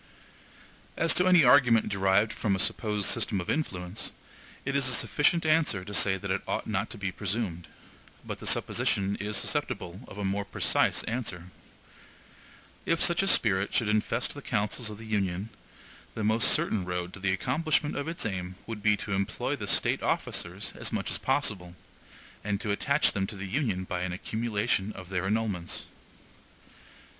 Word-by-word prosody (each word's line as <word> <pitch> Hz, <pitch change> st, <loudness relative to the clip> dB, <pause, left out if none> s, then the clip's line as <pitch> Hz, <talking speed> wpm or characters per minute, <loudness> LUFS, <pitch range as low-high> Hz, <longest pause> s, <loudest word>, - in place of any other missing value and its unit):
As 165 Hz, -, +4 dB
to 180 Hz, -, +3 dB
any 180 Hz, -3 st, +7 dB
argument 120 Hz, -4 st, +6 dB
derived 100 Hz, +2 st, +2 dB
from 100 Hz, -3 st, 0 dB
a -, -, -1 dB
supposed 105 Hz, 0 st, +1 dB
system 100 Hz, -, 0 dB
of 90 Hz, -, -2 dB
influence, 95 Hz, -, -3 dB, 0.5 s
it 140 Hz, +1 st, -1 dB
is 140 Hz, -2 st, +2 dB
a 130 Hz, -, +2 dB
sufficient 160 Hz, +6 st, +2 dB
answer 155 Hz, -, +2 dB
to 105 Hz, -, -8 dB
say 95 Hz, -1 st, +4 dB
that 100 Hz, +1 st, -4 dB
it 95 Hz, -, 0 dB
ought -, -, -2 dB
not 105 Hz, 0 st, -2 dB
to -, -, -6 dB
be 95 Hz, -2 st, -3 dB
presumed; 95 Hz, -3 st, -3 dB, 0.6 s
but -, -, -5 dB
the -, -, -7 dB
supposition 100 Hz, 0 st, +1 dB
is 105 Hz, 0 st, -2 dB
susceptible 90 Hz, 0 st, -2 dB
of 100 Hz, -, -11 dB
a 100 Hz, -, -3 dB
more 100 Hz, +1 st, -1 dB
precise 100 Hz, -, +1 dB
answer. 95 Hz, -7 st, -4 dB, 1.3 s
If 165 Hz, -, +1 dB
such 170 Hz, +1 st, +4 dB
a 195 Hz, -, 0 dB
spirit 100 Hz, -, +3 dB
should 110 Hz, -, +2 dB
infest 105 Hz, 0 st, 0 dB
the -, -, -9 dB
councils 105 Hz, +3 st, -1 dB
of 105 Hz, -, -8 dB
the 115 Hz, -, -10 dB
Union, 100 Hz, -2 st, -1 dB, 0.7 s
the 110 Hz, -, -3 dB
most 110 Hz, +2 st, +5 dB
certain 105 Hz, -4 st, +3 dB
road 90 Hz, 0 st, -4 dB
to -, -, -9 dB
the 95 Hz, 0 st, 0 dB
accomplishment 145 Hz, -, 0 dB
of 145 Hz, -, -3 dB
its 170 Hz, -3 st, -4 dB
aim 90 Hz, -3 st, -3 dB
would 115 Hz, -2 st, -6 dB
be 105 Hz, 0 st, +3 dB
to 100 Hz, -, -6 dB
employ 100 Hz, 0 st, -1 dB
the -, -, -6 dB
State -, -, +2 dB
officers -, -, -2 dB
as -, -, -4 dB
much -, -, -2 dB
as -, -, -2 dB
possible, 90 Hz, -3 st, -1 dB, 0.7 s
and 100 Hz, -1 st, -1 dB
to 105 Hz, -, -2 dB
attach 140 Hz, +8 st, +3 dB
them 95 Hz, -1 st, -1 dB
to 105 Hz, -, -6 dB
the 95 Hz, 0 st, -6 dB
Union 100 Hz, -3 st, -1 dB
by 90 Hz, -1 st, -3 dB
an 90 Hz, 0 st, -2 dB
accumulation 105 Hz, 0 st, -1 dB
of 95 Hz, -2 st, -10 dB
their 95 Hz, 0 st, -1 dB
emoluments. 105 Hz, -5 st, -2 dB
105 Hz, 175 wpm, -28 LUFS, 95-115 Hz, 1.3 s, any